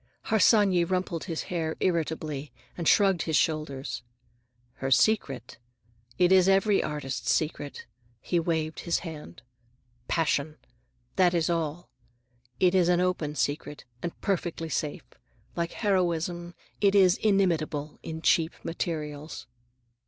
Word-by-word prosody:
Harsanyi 205 Hz, -3 st, +4 dB
rumpled 180 Hz, -1 st, -2 dB
his 165 Hz, -4 st, -3 dB
hair 160 Hz, -3 st, -2 dB
irritably 155 Hz, -5 st, -1 dB, 0.2 s
and 170 Hz, -3 st, -3 dB
shrugged 195 Hz, -5 st, +4 dB
his 160 Hz, 0 st, -1 dB
shoulders. 150 Hz, -4 st, -1 dB, 0.8 s
"Her 135 Hz, -, -3 dB
secret? 135 Hz, -, +1 dB, 0.6 s
It 180 Hz, 0 st, +4 dB
is 190 Hz, 0 st, +6 dB
every 195 Hz, +1 st, +4 dB
artist's 145 Hz, -3 st, -2 dB
secret,"—he 145 Hz, -2 st, -3 dB
waved 160 Hz, -2 st, -1 dB
his 170 Hz, -, 0 dB
hand,—"passion. 130 Hz, +1 st, -4 dB, 0.6 s
That 180 Hz, -2 st, +4 dB
is 170 Hz, 0 st, +1 dB
all. 165 Hz, +1 st, -3 dB, 0.7 s
It 180 Hz, -1 st, +4 dB
is 180 Hz, -2 st, +4 dB
an 175 Hz, -1 st, +3 dB
open 180 Hz, -5 st, -1 dB
secret, 145 Hz, 0 st, -2 dB, 0.2 s
and 170 Hz, -, -5 dB
perfectly 175 Hz, -5 st, -2 dB
safe. 150 Hz, -2 st, -3 dB, 0.5 s
Like 170 Hz, -1 st, -2 dB
heroism, 175 Hz, -3 st, -1 dB, 0.3 s
it 200 Hz, -1 st, +4 dB
is 190 Hz, -1 st, +6 dB
inimitable 165 Hz, -8 st, 0 dB
in 160 Hz, 0 st, -7 dB
cheap 165 Hz, -1 st, +3 dB
materials." 155 Hz, -3 st, -4 dB
165 Hz, 115 wpm, -27 LUFS, 150-180 Hz, 0.8 s, is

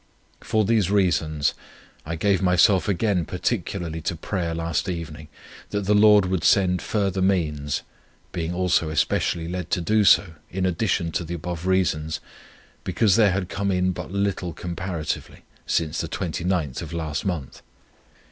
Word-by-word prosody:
For 110 Hz, -1 st, +1 dB
these 105 Hz, -4 st, +2 dB
reasons 80 Hz, -7 st, +1 dB, 0.5 s
I 80 Hz, -, -2 dB
gave 95 Hz, +3 st, +1 dB
myself 90 Hz, +1 st, +4 dB
again 100 Hz, -1 st, +1 dB
particularly 90 Hz, -3 st, -3 dB
to 85 Hz, +1 st, -2 dB
prayer 85 Hz, -1 st, -3 dB
last 85 Hz, +2 st, -1 dB
evening, 80 Hz, -3 st, -6 dB, 0.4 s
that 100 Hz, -, -1 dB
the 100 Hz, +2 st, +1 dB
Lord 105 Hz, -1 st, +6 dB
would 95 Hz, -1 st, -1 dB
send 90 Hz, -3 st, +3 dB
further 100 Hz, -3 st, -1 dB
means, 75 Hz, -7 st, 0 dB, 0.5 s
being 85 Hz, -2 st, -3 dB
also 90 Hz, -3 st, +1 dB
especially 80 Hz, +1 st, 0 dB
led 90 Hz, -1 st, -4 dB
to -, -, +1 dB
do 105 Hz, +5 st, +2 dB
so, 95 Hz, -3 st, +5 dB, 0.2 s
in 95 Hz, +1 st, -2 dB
addition 90 Hz, -2 st, 0 dB
to 85 Hz, -, -2 dB
the 85 Hz, +1 st, -5 dB
above 85 Hz, +1 st, -5 dB
reasons, 80 Hz, -4 st, +1 dB, 0.6 s
because 95 Hz, +1 st, +2 dB
there 105 Hz, -4 st, +5 dB
had 95 Hz, 0 st, -1 dB
come 100 Hz, +2 st, -2 dB
in 90 Hz, -1 st, +1 dB
but 90 Hz, -, -6 dB
little 100 Hz, -3 st, -1 dB
comparatively, 85 Hz, -2 st, -5 dB, 0.2 s
since 80 Hz, -2 st, 0 dB
the -, -, -5 dB
29th 85 Hz, -5 st, -2 dB
of 80 Hz, 0 st, -7 dB
last 80 Hz, -3 st, -3 dB
month. 85 Hz, -9 st, -4 dB
90 Hz, 150 wpm, -24 LUFS, 80-95 Hz, 0.6 s, Lord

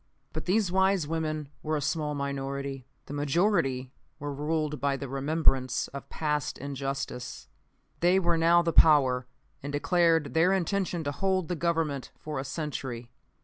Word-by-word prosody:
"But -, -, -4 dB
these 190 Hz, 0 st, +2 dB
wise 190 Hz, -3 st, +2 dB
women 155 Hz, -2 st, -2 dB
were 155 Hz, 0 st, -1 dB
a -, -, -1 dB
small 150 Hz, +1 st, -1 dB
minority. 140 Hz, -1 st, -4 dB, 0.2 s
The -, -, -8 dB
majority 145 Hz, -3 st, +1 dB, 0.3 s
were 145 Hz, 0 st, -4 dB
ruled 150 Hz, 0 st, -1 dB
by 140 Hz, -1 st, +1 dB
the 140 Hz, -, -5 dB
remembrance 135 Hz, -2 st, +1 dB
of 140 Hz, 0 st, -8 dB
past 150 Hz, -2 st, -1 dB
injustice. 135 Hz, -, -5 dB, 0.5 s
They 175 Hz, +2 st, +4 dB
were 170 Hz, -3 st, +2 dB
now 170 Hz, +1 st, +5 dB
the 165 Hz, -1 st, 0 dB
power, 130 Hz, -5 st, +5 dB, 0.3 s
and 145 Hz, -, -5 dB
declared 165 Hz, -1 st, +2 dB
their 175 Hz, +4 st, +4 dB
intention 185 Hz, -2 st, 0 dB
to 145 Hz, -, -1 dB
hold 190 Hz, +2 st, 0 dB
the 180 Hz, -, 0 dB
Government 160 Hz, -5 st, -1 dB
for 150 Hz, -3 st, -5 dB
a -, -, -2 dB
century. 135 Hz, -5 st, -5 dB
150 Hz, 150 wpm, -28 LUFS, 135-170 Hz, 0.5 s, now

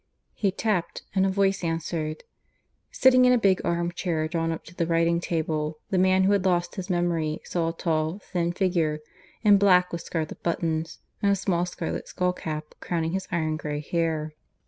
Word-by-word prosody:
He 200 Hz, -, +1 dB
tapped; 200 Hz, -3 st, -1 dB
and 190 Hz, 0 st, +3 dB
a -, -, +1 dB
voice 195 Hz, 0 st, +1 dB
answered. 165 Hz, -1 st, -2 dB, 0.7 s
Sitting 255 Hz, -1 st, +5 dB
in 250 Hz, -, +6 dB
a -, -, +5 dB
big 195 Hz, -5 st, +3 dB
arm 170 Hz, 0 st, 0 dB
chair 165 Hz, -3 st, -1 dB
drawn 165 Hz, 0 st, -1 dB
up 165 Hz, -, -5 dB
to 170 Hz, -, -13 dB
the 170 Hz, -1 st, -1 dB
writing 170 Hz, 0 st, +2 dB
table, 155 Hz, -2 st, -2 dB
the 190 Hz, -, +2 dB
man 185 Hz, 0 st, +4 dB
who 195 Hz, -, +4 dB
had 200 Hz, -2 st, +2 dB
lost 175 Hz, -2 st, +1 dB
his 190 Hz, 0 st, -6 dB
memory 170 Hz, -3 st, 0 dB
saw 165 Hz, -2 st, -1 dB
a -, -, -4 dB
tall, 160 Hz, 0 st, -1 dB
thin 175 Hz, -4 st, -2 dB
figure, 170 Hz, -5 st, 0 dB, 0.4 s
in 205 Hz, -2 st, +6 dB
black 180 Hz, -2 st, +5 dB
with 170 Hz, -, -4 dB
scarlet 160 Hz, -3 st, -4 dB
buttons, 165 Hz, -1 st, -2 dB, 0.2 s
and 200 Hz, -, +3 dB
a -, -, +4 dB
small 180 Hz, -2 st, 0 dB
scarlet 175 Hz, -1 st, -4 dB
skull 180 Hz, 0 st, 0 dB
cap 155 Hz, -3 st, -6 dB
crowning 165 Hz, -2 st, -2 dB
his 190 Hz, +1 st, -3 dB
iron 155 Hz, -2 st, 0 dB
grey 150 Hz, -1 st, -3 dB
hair. 155 Hz, 0 st, -1 dB
170 Hz, 190 wpm, -26 LUFS, 160-190 Hz, 0.7 s, in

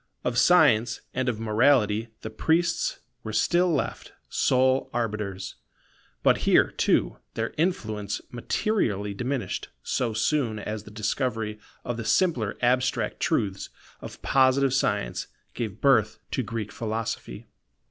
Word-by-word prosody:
Of 125 Hz, -1 st, +1 dB
science 125 Hz, -11 st, +4 dB
and 130 Hz, 0 st, 0 dB
of 110 Hz, -3 st, -3 dB
morality 110 Hz, -1 st, +3 dB
the 110 Hz, -, -6 dB
priests 175 Hz, -, 0 dB, 0.2 s
were -, -, -5 dB
still 175 Hz, 0 st, +3 dB
left 150 Hz, -, -2 dB, 0.2 s
sole 130 Hz, +1 st, +2 dB
arbiters; 105 Hz, -5 st, -3 dB, 0.7 s
but -, -, +4 dB
here, -, -, +4 dB
too, -, -, +1 dB, 0.2 s
their -, -, -2 dB
influence 110 Hz, -, -1 dB
materially 115 Hz, -, -1 dB
diminished 125 Hz, +4 st, -3 dB
so 120 Hz, -3 st, -1 dB
soon 115 Hz, 0 st, 0 dB
as 105 Hz, 0 st, -5 dB
the -, -, -10 dB
discovery 105 Hz, 0 st, -2 dB, 0.3 s
of 120 Hz, -1 st, -3 dB
the 115 Hz, -, -4 dB
simpler 115 Hz, -, +1 dB
abstract 125 Hz, +2 st, +1 dB
truths 95 Hz, -2 st, -1 dB, 0.3 s
of -, -, -10 dB
Positive 135 Hz, 0 st, +3 dB
science -, -, 0 dB, 0.3 s
gave 110 Hz, -5 st, -5 dB
birth 115 Hz, -7 st, +3 dB
to -, -, 0 dB
Greek 115 Hz, -3 st, -4 dB
Philosophy. 110 Hz, -, -4 dB
115 Hz, 125 wpm, -26 LUFS, 105-135 Hz, 0.7 s, science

